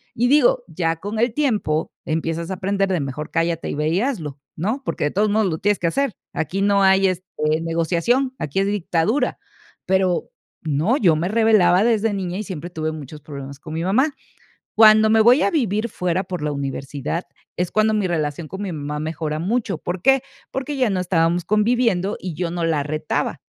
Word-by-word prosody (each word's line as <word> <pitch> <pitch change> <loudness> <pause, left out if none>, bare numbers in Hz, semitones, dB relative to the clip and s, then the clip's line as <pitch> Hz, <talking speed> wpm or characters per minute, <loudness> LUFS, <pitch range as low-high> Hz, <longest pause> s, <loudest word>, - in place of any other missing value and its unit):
Y 240 +1 +2
digo, 260 -2 +4
ya 165 -1 -1
con 205 +6 -5
el 235 0 +2
tiempo, 215 - 0
empiezas 165 +2 -2
a - - -2
aprender 195 +1 0
de 185 -3 +1
mejor 140 +2 -5
cállate, 165 0 -1
y - - -3
ve, 150 +1 -1
y 175 +5 +1
hazlo, 165 - -3 0.2
¿no? 220 - -2
Porque - - -2
de 145 - 0
todos 210 +2 +1
modos 215 0 +2
lo 160 - -2
tienes 205 +3 +1
que 170 - 0
hacer. 275 +5 0 0.2
Aquí 190 +5 -2
no 200 0 +3
hay, 190 0 +5
este, 185 -1 -2 0.4
negociación, 170 +11 0
aquí 150 +6 -2
es 195 - +1
dictadura. 205 - 0 0.5
Pero 185 -2 +1 0.3
no, 160 - +1
yo 175 - +4
me 165 +4 -1
rebelaba 210 -4 +4
desde 225 -2 +2
niña 185 -2 -3
y 215 - -3
siempre 175 -3 -6
tuve 155 -2 -3
muchos 150 -1 -9
problemas 140 -1 -8
con 155 +1 -9
mi 165 +1 -2
mamá. 260 - +2 0.6
Cuando 215 0 +7
me 220 0 +5
voy 245 +6 +6
a - - +2
vivir 235 - 0
fuera 180 -1 -1
por 180 -4 -5
la 150 0 -1
universidad 140 +3 -4 0.3
es 180 0 -1
cuando 215 0 +2
mi 210 -3 +1
relación 155 -2 -2
con 190 +5 -6
mi 195 - -3
mamá 150 -1 -4
mejora 155 0 -3
mucho. 200 +1 -1
¿Por 175 +3 -4
qué? 270 +4 +4 0.3
Porque 265 +2 -3
ya 255 -3 +2
no 190 -2 0
estábamos 170 -1 +1
conviviendo, 210 -2 +1
y 180 -2 -5
yo 170 +1 -2
no 170 -1 -1
la 160 -3 +1
retaba. 155 +1 -2
185 Hz, 200 wpm, -21 LUFS, 160-215 Hz, 0.6 s, Cuando